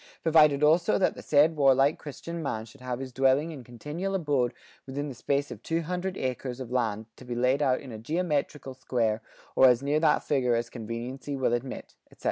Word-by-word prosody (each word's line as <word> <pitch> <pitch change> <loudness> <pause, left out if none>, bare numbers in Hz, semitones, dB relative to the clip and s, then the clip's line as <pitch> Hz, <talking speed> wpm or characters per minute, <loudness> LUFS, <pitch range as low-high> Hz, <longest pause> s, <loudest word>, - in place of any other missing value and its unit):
Provided 150 -3 +5
also 165 +3 +4
that 190 - +2
the - - -10
said 155 +2 +4
warlike 135 0 +4
christian 165 +3 -7
man 110 -7 -3
shall 125 +4 -17
have 125 -1 -3
his 130 0 -6
dwelling 135 +5 +2
and 135 -4 -9
continual 150 - -4
abode 145 -9 +1 0.4
within 145 +2 -4
the - - -6
space 140 +3 -1
of - - -8
two 165 +1 -1
hundred 180 +3 -3
acres 130 -1 -3
of 125 -2 -7
land 110 -4 -1
to - - -12
be 125 -1 -5
laid 125 +4 +2
out 130 -3 +2
in 135 - -10
a 110 - -7
geometricall 150 -1 -2
square 115 -4 -1 0.3
or 130 - +7
as 125 +1 +4
near 145 +2 +2
that 155 -1 +3
figure 125 -4 +1
as 120 +1 -2
conveniency 120 +5 -5
will 130 -3 +1
admit," 120 +2 -4
etc. - - -22
135 Hz, 205 wpm, -28 LUFS, 125-150 Hz, 0.4 s, or